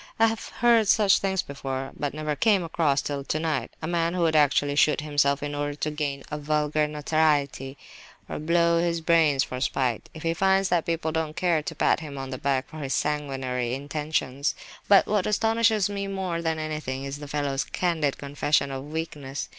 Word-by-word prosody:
I 225 - +5
have 225 0 -2
heard 240 -1 +6
of 215 - -1
such 205 -2 +5
things 190 -2 0
before, 135 -1 -5
but 145 -1 -3
never 155 -1 -2
came 205 0 +3
across, 155 -4 +1
till 140 -1 -3
tonight, 155 -4 -1
a - - -2
man 170 0 0
who 175 - +1
would 160 -1 +2
actually 145 -1 +3
shoot 150 0 +3
himself 145 -1 +1
in 145 0 -3
order 145 0 -2
to 155 +1 -2
gain 145 -2 -3
a 150 - -3
vulgar 150 0 +1
notoriety, 150 -3 0 0.5
or - - -5
blow 170 +2 +2
out - - +1
his 170 -1 0
brains 160 -4 +3
for 125 0 -6
spite, 125 -4 -1
if 160 - -9
he 165 0 +1
finds 190 +2 +2
that 175 -2 +1
people 165 -1 -1
don't 160 -1 -2
care 170 -3 +2
to - - -6
pat - - +2
him 150 -3 -8
on 135 0 -5
the 130 - -5
back 135 -1 0
for 155 - -11
his 140 -2 -2
sanguinary 135 -4 -2
intentions. 145 -1 -2 0.3
But 200 -1 +6
what 210 -3 0
astonishes 225 -1 +2
me 200 -1 -4
more 190 -4 -3
than 160 -1 -1
anything 150 -4 -4
is 140 +1 -5
the 145 - -8
fellow's 140 -1 -1
candid 160 -6 -1
confession 140 0 0
of 135 0 -5
weakness. 150 -4 -5
150 Hz, 200 wpm, -26 LUFS, 140-170 Hz, 0.5 s, heard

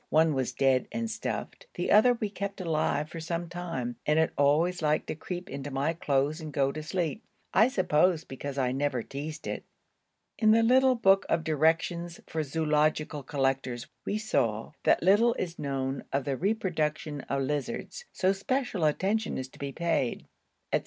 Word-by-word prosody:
One 160 0 +4
was 130 -2 -1
dead 135 -2 +2
and 225 +1 -2
stuffed; - - -5
the - - -1
other 245 +4 +6
we 215 -3 -3
kept 200 -1 -5
alive 155 -3 0
for 165 - -8
some 170 +1 -3
time 165 -9 -4
and 150 +1 +2
it 160 0 +2
always 160 +6 +2
liked 150 -1 +1
to - - -2
creep 180 +3 -6
into 140 -4 -5
my 140 +4 0
clothes 150 -2 0
and 155 -1 -6
go 135 -1 +1
to 155 - -5
sleep 175 +5 -2 0.3
I 220 - +6
suppose 180 -6 +2
because 140 +1 -6
I 130 -2 +1
never 135 -3 -1
teased 150 +3 -6
it. - - -4 0.8
In 220 - +4
the 225 0 +4
little 260 +2 +5
book 195 -4 +4
of 165 - +1
directions 165 +2 +1
for 160 - -2
zoological 155 0 0
collectors 135 -3 -1 0.2
we 205 - -1
saw, 115 - 0
that - - +4
'little 210 +6 +5
is 175 -1 -4
known 135 -1 -2
of 140 0 0
the 140 -2 0
reproduction 155 -5 -1
of 140 0 0
lizards, 150 - -3
so 185 +1 +2
special 210 - -1
attention 200 +8 0
is 130 0 -5
to - - -18
be 140 -1 -4
paid,' 160 -6 -1 0.5
&c. - - +4
155 Hz, 175 wpm, -29 LUFS, 140-185 Hz, 0.8 s, other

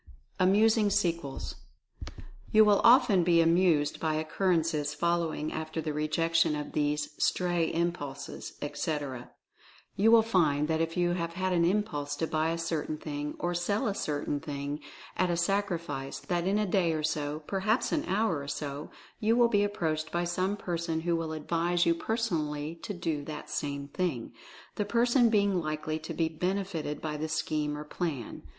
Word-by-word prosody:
AMUSING 210 +3 +4
SEQUELS. 170 -8 -1 0.9
You 215 0 +7
will 205 -1 +4
often 235 -6 +6
be 170 -1 +4
amused 165 -3 +3
by 155 -1 0
occurrences 160 -2 0
following 170 -3 0
after 160 +1 -4
the 155 -1 -2
rejection 165 +1 +1
of 150 0 -5
these 150 0 0
"stray 175 -2 +1
impulses," 165 -5 -3
etc. 145 -3 -3 0.7
You 215 +3 +4
will 225 -1 +7
find 155 -9 +2
that 160 0 +1
if 165 +2 -2
you 175 0 +2
have 170 -1 -2
had 185 +1 -1
an 170 -1 +3
impulse 170 -7 0
to 160 - -1
buy 160 0 0
a 165 - -1
cer 165 -2 -1
tain 155 - -3
thing, 150 -1 -5
or 175 0 -1
sell 200 +7 0
a 205 - 0
certain 145 -4 -2
thing 140 0 -4 0.4
at 185 0 +2
a 170 - 0
sacrifice, 170 -7 -1
that 175 0 -2
in 200 +2 +2
a 210 - +1
day 180 -4 +2
or 155 -1 -2
so, 150 0 -2
perhaps 205 - 0
an 305 - +1
hour 195 -4 +1
or 140 - -7
so, 145 0 -4 0.3
you 225 0 +3
will 240 -1 +5
be 205 -3 +3
ap 205 0 -2
proached 155 -1 -1
by 175 0 0
some 185 +3 -1
person 170 -3 -2
who 170 +1 +1
will 165 -1 -2
advise 170 +3 0
you 170 - +4
person 220 +2 -1
ally 150 +1 -3
to 205 - -5
do 160 -4 -2
that 150 0 -7
same 140 -1 -3
thing, 145 -8 -2 0.4
the 210 - +1
person 240 +2 +3
being 200 -4 +2
likely 155 0 -3
to 160 - -6
be 165 - +1
benefited 180 -2 -2
by 150 -1 -2
the 155 +1 -3
scheme 150 -1 -1
or 150 - -5
plan. 150 -5 -4
165 Hz, 175 wpm, -29 LUFS, 150-185 Hz, 0.9 s, You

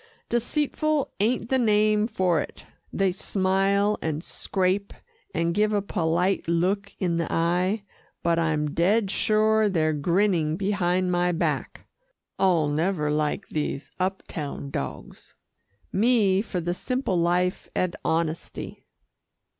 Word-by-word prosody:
"Deceitful 295 +4 0
ain't 230 +3 +1
the 265 - +2
name 215 -1 +3
for 185 -7 +1
it. - - -9 0.3
They 195 -1 +1
smile 195 +2 +1
and 160 0 -2
scrape, 190 +1 -1 0.4
and 170 - 0
give 210 +3 +2
a 205 - +2
polite 180 0 0
look 190 +4 0
in 175 -3 0
the 165 - -2
eye, 180 +5 +1 0.4
but 170 0 +2
I'm 155 -2 0
dead 195 +5 +2
sure 215 0 +3
they're 155 -4 +1
grinning 170 0 +1
behind 185 -2 +1
my 175 0 +2
back. 170 - -2 0.5
I'll 175 -5 +3
never 150 0 0
like 150 0 -1
these 150 -2 -3
up 190 +1 -1
town 140 -2 -5
dogs. 70 - -6 0.6
Me 205 -3 +3
for 200 -4 -4
the 175 +1 -1
simple 255 +1 -2
life 180 +2 0
and 180 -1 0
honesty." 165 0 -3
185 Hz, 125 wpm, -25 LUFS, 170-210 Hz, 0.6 s, name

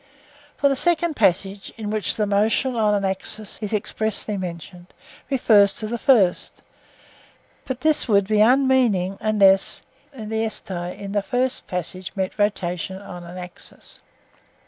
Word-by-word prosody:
For 280 - +3
the 275 - +2
second 340 +2 +1
passage, 195 0 0
in 210 -2 -4
which 215 0 -1
motion 215 +5 +1
on 210 -2 +2
an 200 -1 -1
axis 195 +2 -4
is 210 - -4
expressly 215 0 -1
mentioned, 175 -1 -8 0.3
refers 215 -7 +4
to 215 - -4
the 235 +2 -4
first, 210 -10 +2 1.0
but 260 -1 -5
this 310 -1 +2
would 200 -4 +3
be 215 0 +2
unmeaning 240 -6 +3
unless 200 -3 +3 0.3
(Greek) 255 -5 -9
in 200 -4 -4
the 205 0 +1
first 250 +4 -1
passage 180 +1 -4
meant 190 +1 -3
rotation 190 -2 -1
on 180 -3 -9
an 175 +1 -10
axis. 180 -1 -10
205 Hz, 135 wpm, -22 LUFS, 190-230 Hz, 1.0 s, refers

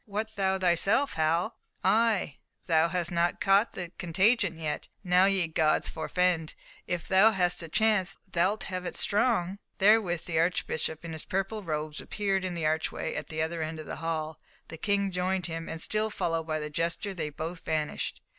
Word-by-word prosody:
What, 220 +1 -4
thou 190 -1 +1
thyself, 195 +9 +2
Hal? 165 +8 +1 0.3
Ay, 220 - +2 0.3
thou 160 -1 +4
hast 175 0 -2
not 170 0 +1
caught 200 +3 +3
the 175 -2 -6
contagion 185 +1 +2
yet! 150 -2 -3 0.2
Now 180 0 +5
ye 195 -3 +2
gods 160 -1 +2
forefend! 175 -1 0 0.3
If 175 -1 -3
thou 195 +3 +6
hast 180 -4 +1
the 165 - -2
chance, 195 -1 +2
thou'lt 190 +3 +1
have 185 -1 -4
it - - -5
strong." 200 -3 +1 0.2
Therewith 195 -5 +3
the 165 -2 0
Archbishop, 165 -1 -1
in 165 - -5
his 160 - -4
purple 195 +3 -2
robes, 155 -3 -3
appeared 195 -2 -1
in 185 -2 -3
the 165 -2 -2
archway 155 +1 -1
at 150 - -4
the 155 0 -2
other 165 +1 -3
end 160 0 -4
of 155 - -7
the - - -6
hall, 160 -1 -3 0.3
the 165 - -7
King 200 +2 +1
joined 180 +1 -1
him, 165 -1 -5
and 160 - -5
still 215 +5 0
followed 165 -5 -2
by 155 -1 -1
the 150 0 -5
jester, 170 +6 -2
they 160 -4 -3
both 160 +4 -5
vanished. 155 -1 -2
175 Hz, 185 wpm, -29 LUFS, 160-195 Hz, 0.3 s, thou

